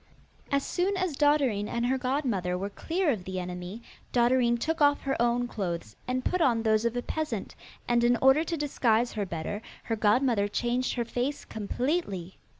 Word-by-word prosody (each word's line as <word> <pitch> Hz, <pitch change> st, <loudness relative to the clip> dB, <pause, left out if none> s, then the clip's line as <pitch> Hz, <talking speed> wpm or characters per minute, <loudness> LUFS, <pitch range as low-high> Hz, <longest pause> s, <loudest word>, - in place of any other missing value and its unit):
As 280 Hz, -1 st, +1 dB
soon 380 Hz, +2 st, 0 dB
as 370 Hz, -5 st, -1 dB
Dotterine 275 Hz, -8 st, +2 dB
and 235 Hz, +2 st, -1 dB
her 260 Hz, +2 st, +1 dB
godmother 250 Hz, -9 st, -1 dB
were 200 Hz, +2 st, -4 dB
clear 335 Hz, -, 0 dB
of 210 Hz, -8 st, -3 dB
the 185 Hz, 0 st, -4 dB
enemy, 180 Hz, +5 st, -6 dB, 0.3 s
Dotterine 240 Hz, 0 st, +3 dB
took 320 Hz, +6 st, -2 dB
off 290 Hz, 0 st, +4 dB
her 270 Hz, -1 st, -1 dB
own 240 Hz, +1 st, +2 dB
clothes, 170 Hz, -, -4 dB
and 255 Hz, 0 st, -1 dB
put 365 Hz, -, +1 dB
on 235 Hz, -7 st, +3 dB
those 220 Hz, 0 st, +2 dB
of 235 Hz, +1 st, 0 dB
a 245 Hz, -, -2 dB
peasant, 300 Hz, -10 st, -3 dB, 0.3 s
and 240 Hz, 0 st, +3 dB
in 240 Hz, 0 st, +4 dB
order 265 Hz, +5 st, +5 dB
to 335 Hz, 0 st, -3 dB
disguise 245 Hz, -5 st, +1 dB
her 205 Hz, -3 st, -2 dB
better 170 Hz, +5 st, -4 dB, 0.2 s
her 225 Hz, -, -1 dB
godmother 215 Hz, 0 st, +3 dB
changed 240 Hz, +4 st, -1 dB
her 240 Hz, -2 st, -1 dB
face 250 Hz, +5 st, -2 dB
completely. 215 Hz, -, -3 dB
240 Hz, 180 wpm, -28 LUFS, 210-275 Hz, 0.3 s, order